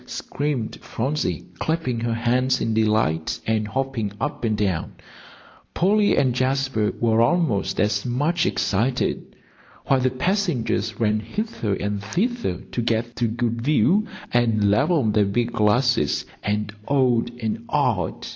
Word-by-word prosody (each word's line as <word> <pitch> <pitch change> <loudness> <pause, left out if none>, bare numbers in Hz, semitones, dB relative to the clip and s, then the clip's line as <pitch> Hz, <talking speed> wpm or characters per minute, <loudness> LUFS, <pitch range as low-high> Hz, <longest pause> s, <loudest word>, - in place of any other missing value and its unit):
screamed 140 -6 -3
Phronsie, 140 +6 -2
clapping 160 -7 -1
her 115 0 -1
hands 125 +3 +1
in 115 - -1
delight, 105 -8 +1
and 110 -1 0
hopping 130 -3 -2
up 150 - -3
and 110 -2 +1
down, 95 -5 -1 0.8
Polly 205 +3 +3
and 130 -3 +3
Jasper 130 -4 0
were 115 -1 +3
almost 120 - +1
as 105 -1 +1
much 150 +8 0
excited, 120 +6 -1 0.5
while 135 - +3
the 130 0 +2
passengers 130 - -1
ran 110 -1 +2
hither 115 - -3
and 100 +1 -3
thither 235 - -1
to 120 - -1
get 115 +1 -1
a 120 - +3
good 115 0 -2
view, 155 - +3 0.3
and 110 -4 +3
levelled 135 - +2
their 105 -1 +4
big 115 +4 0
glasses, 110 - +2 0.2
and 105 0 -2
oh 130 -4 +3
ed 120 - -7
and 110 0 -3
ah - - +2
ed. - - -8
120 Hz, 140 wpm, -23 LUFS, 110-135 Hz, 0.8 s, their